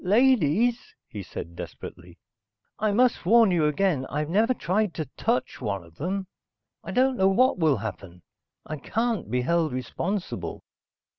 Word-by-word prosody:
"Ladies," 230 Hz, -, +2 dB
he 105 Hz, -, -7 dB
said 85 Hz, -2 st, -8 dB
desperately. 90 Hz, 0 st, -9 dB, 0.6 s
"I 215 Hz, 0 st, +1 dB
must 245 Hz, +3 st, +2 dB
warn 220 Hz, +2 st, +5 dB
you 165 Hz, -4 st, +3 dB
again. 150 Hz, -4 st, +1 dB
I've 150 Hz, +2 st, -3 dB
never 220 Hz, +6 st, +3 dB
tried 195 Hz, -1 st, 0 dB
to 155 Hz, -, -3 dB
touch 235 Hz, -, -1 dB
one 100 Hz, -6 st, -2 dB
of 85 Hz, -1 st, -18 dB
them. 190 Hz, +4 st, -2 dB, 0.6 s
I -, -, -8 dB
don't 260 Hz, 0 st, +2 dB
know 190 Hz, -, +4 dB
what 240 Hz, +1 st, +3 dB
will 155 Hz, -5 st, +3 dB
happen. 95 Hz, -5 st, -7 dB, 0.4 s
I 155 Hz, -, -5 dB
can't 225 Hz, -, -2 dB
be 125 Hz, +2 st, 0 dB
held 165 Hz, +3 st, +1 dB
responsible." 175 Hz, +10 st, -4 dB
180 Hz, 150 wpm, -26 LUFS, 130-220 Hz, 0.6 s, warn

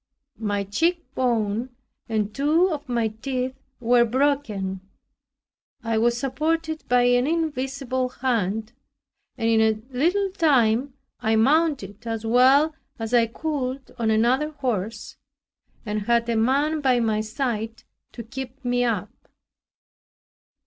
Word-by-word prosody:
My 205 Hz, -2 st, -1 dB
cheekbone 245 Hz, -, 0 dB, 0.4 s
and 215 Hz, -2 st, -1 dB
two 315 Hz, +6 st, +2 dB
of 295 Hz, -3 st, -5 dB
my 235 Hz, -2 st, +1 dB
teeth 255 Hz, +3 st, -3 dB, 0.3 s
were 240 Hz, 0 st, +4 dB
broken. 235 Hz, -7 st, 0 dB, 1.0 s
I 230 Hz, -1 st, 0 dB
was 235 Hz, +1 st, +2 dB
supported 315 Hz, +5 st, -1 dB
by 245 Hz, 0 st, +4 dB
an 245 Hz, +1 st, +3 dB
invisible 270 Hz, -5 st, -1 dB
hand 225 Hz, -3 st, -1 dB, 0.6 s
and 225 Hz, -, -1 dB
in 225 Hz, -1 st, +4 dB
a 220 Hz, -1 st, +2 dB, 0.2 s
little 370 Hz, +8 st, +1 dB
time 265 Hz, -, +2 dB, 0.2 s
I 220 Hz, -2 st, +1 dB
mounted 250 Hz, -, +1 dB
as 225 Hz, -1 st, -3 dB
well 265 Hz, +7 st, +5 dB, 0.2 s
as 225 Hz, +1 st, -5 dB
I 235 Hz, -1 st, +5 dB
could 265 Hz, 0 st, -4 dB
on 225 Hz, -1 st, +1 dB
another 240 Hz, +7 st, +2 dB
horse 230 Hz, -7 st, -3 dB, 0.7 s
and 210 Hz, 0 st, -2 dB
had 235 Hz, 0 st, +2 dB
a 230 Hz, -, +1 dB
man 280 Hz, +7 st, +2 dB
by 255 Hz, -3 st, +3 dB
my 220 Hz, -2 st, +1 dB
side 225 Hz, -1 st, -3 dB, 0.3 s
to 235 Hz, -, -7 dB
keep 260 Hz, +3 st, -8 dB
me 245 Hz, 0 st, +1 dB
up. 225 Hz, -6 st, -1 dB
245 Hz, 120 wpm, -24 LUFS, 225-275 Hz, 1.0 s, well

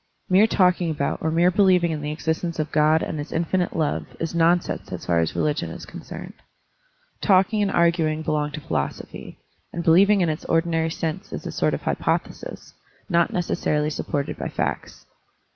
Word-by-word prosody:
Mere 195 Hz, +4 st, +6 dB
talking 180 Hz, -4 st, +2 dB
about 145 Hz, -3 st, -1 dB
or 160 Hz, -, 0 dB
mere 170 Hz, +3 st, +3 dB
believing 185 Hz, -3 st, +4 dB
in 155 Hz, -2 st, -3 dB
the 150 Hz, 0 st, -3 dB
existence 160 Hz, +2 st, -2 dB
of 155 Hz, 0 st, -2 dB
God 155 Hz, +1 st, +3 dB
and 155 Hz, -, -4 dB
his 145 Hz, -, -6 dB
infinite 175 Hz, +2 st, 0 dB
love 155 Hz, -3 st, -1 dB
is 165 Hz, 0 st, -3 dB
nonsense 170 Hz, +1 st, +1 dB
as -, -, -6 dB
far 85 Hz, -1 st, +2 dB
as 80 Hz, -, 0 dB
religicm 150 Hz, 0 st, -1 dB
is -, -, -8 dB
concerned. -, -, -9 dB, 0.9 s
Talking 195 Hz, +2 st, +3 dB
and 200 Hz, -, +2 dB
arguing 165 Hz, -3 st, +2 dB
belong 150 Hz, -1 st, 0 dB
to 155 Hz, -, -6 dB
philosophy, -, -, -4 dB, 0.3 s
and 170 Hz, -, -4 dB
believing 195 Hz, +5 st, +5 dB
in 170 Hz, -, +2 dB
its 155 Hz, +2 st, -3 dB
ordinary 165 Hz, 0 st, +1 dB
sense 160 Hz, +3 st, -4 dB
is -, -, -6 dB
a -, -, -4 dB
sort -, -, +1 dB
of -, -, -8 dB
hypothesis, -, -, -3 dB, 0.4 s
not 170 Hz, -2 st, +2 dB
neces 175 Hz, -1 st, -2 dB
sarily 150 Hz, 0 st, +1 dB
supported 145 Hz, -1 st, -3 dB
by -, -, -3 dB
facts. -, -, -4 dB
165 Hz, 175 wpm, -23 LUFS, 155-180 Hz, 0.9 s, Mere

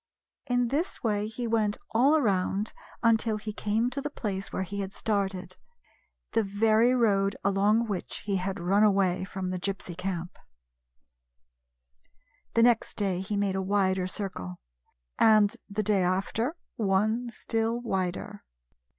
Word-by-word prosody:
In 245 Hz, -1 st, +1 dB
this 300 Hz, +5 st, -2 dB
way 210 Hz, -2 st, 0 dB
he 225 Hz, +2 st, -5 dB
went 220 Hz, -2 st, +1 dB
all 270 Hz, +7 st, +4 dB
around 200 Hz, -4 st, 0 dB, 0.3 s
until 225 Hz, -1 st, +3 dB
he 215 Hz, 0 st, -6 dB
came 220 Hz, +4 st, 0 dB
to 275 Hz, +2 st, -3 dB
the 295 Hz, -, -3 dB
place 195 Hz, -8 st, -4 dB
where 190 Hz, -, -2 dB
he 200 Hz, +2 st, -5 dB
had 195 Hz, 0 st, -4 dB
started 195 Hz, -3 st, -2 dB, 0.4 s
— -, -, -41 dB
the 225 Hz, -, +3 dB
very 220 Hz, +4 st, +3 dB
road 200 Hz, -4 st, +2 dB
along 205 Hz, +4 st, +3 dB
which 200 Hz, -5 st, -4 dB
he 200 Hz, -2 st, 0 dB
had 190 Hz, +1 st, -3 dB
run 190 Hz, +4 st, +2 dB
away 195 Hz, -3 st, +3 dB
from 190 Hz, -1 st, -4 dB
the 185 Hz, -, -3 dB
Gypsy 190 Hz, -2 st, -4 dB
camp. 180 Hz, -1 st, -4 dB, 2.2 s
The 230 Hz, -, +5 dB
next 240 Hz, -2 st, +3 dB
day 195 Hz, -4 st, +1 dB
he 205 Hz, +2 st, -3 dB
made 200 Hz, -1 st, 0 dB
a 190 Hz, -, 0 dB
wider 190 Hz, -1 st, +1 dB
circle; 185 Hz, -, -4 dB, 0.6 s
and 215 Hz, 0 st, +5 dB
the 210 Hz, +1 st, -1 dB
day 200 Hz, -1 st, +2 dB
after 195 Hz, -, 0 dB, 0.2 s
one 220 Hz, +4 st, +1 dB
still 225 Hz, +1 st, -1 dB
wider. 195 Hz, -2 st, -3 dB
205 Hz, 145 wpm, -28 LUFS, 190-225 Hz, 2.2 s, The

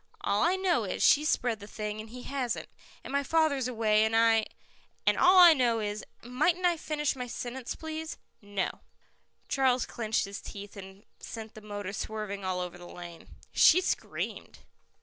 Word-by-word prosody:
"All 200 Hz, +1 st, +1 dB
I 350 Hz, +3 st, +3 dB
know 375 Hz, -2 st, +1 dB
is, -, -, -2 dB
she's 300 Hz, +1 st, +5 dB
spread 235 Hz, -3 st, 0 dB
the 205 Hz, -, -10 dB
thing 210 Hz, 0 st, -5 dB
and 220 Hz, -, -11 dB
he 250 Hz, +2 st, -9 dB
hasn't, 265 Hz, -4 st, -3 dB, 0.3 s
and -, -, -7 dB
my 280 Hz, -, +2 dB
father's 285 Hz, -3 st, +1 dB
away 220 Hz, -3 st, +2 dB
and 220 Hz, +1 st, +1 dB
I 225 Hz, -1 st, +4 dB, 0.3 s
" -, -, -35 dB
"And -, -, +4 dB
all 365 Hz, +1 st, +5 dB
that 360 Hz, -2 st, +10 dB
I -, -, +7 dB
know 240 Hz, -5 st, +2 dB
is 210 Hz, 0 st, -3 dB, 0.2 s
" -, -, -34 dB
"Might 255 Hz, +8 st, +1 dB
I 350 Hz, -1 st, +4 dB
finish 300 Hz, -3 st, -2 dB
my 250 Hz, -1 st, -5 dB
sentence, 245 Hz, +1 st, -5 dB
please?" 320 Hz, 0 st, -6 dB, 0.2 s
"No." 205 Hz, -2 st, -3 dB, 0.7 s
Charles 260 Hz, -2 st, +2 dB
clenched 220 Hz, -3 st, -1 dB
his 200 Hz, 0 st, -7 dB
teeth 205 Hz, +1 st, -9 dB
and 195 Hz, 0 st, -11 dB, 0.2 s
sent 220 Hz, -1 st, -8 dB
the 215 Hz, -, -11 dB
motor 205 Hz, -2 st, -6 dB
swerving 210 Hz, -1 st, -4 dB
all 185 Hz, -1 st, -1 dB
over 180 Hz, 0 st, -6 dB
the 175 Hz, -, -10 dB
lane. 175 Hz, -1 st, -10 dB, 0.2 s
She 355 Hz, -, +6 dB
screamed. 370 Hz, -, -4 dB
225 Hz, 190 wpm, -29 LUFS, 205-280 Hz, 0.7 s, that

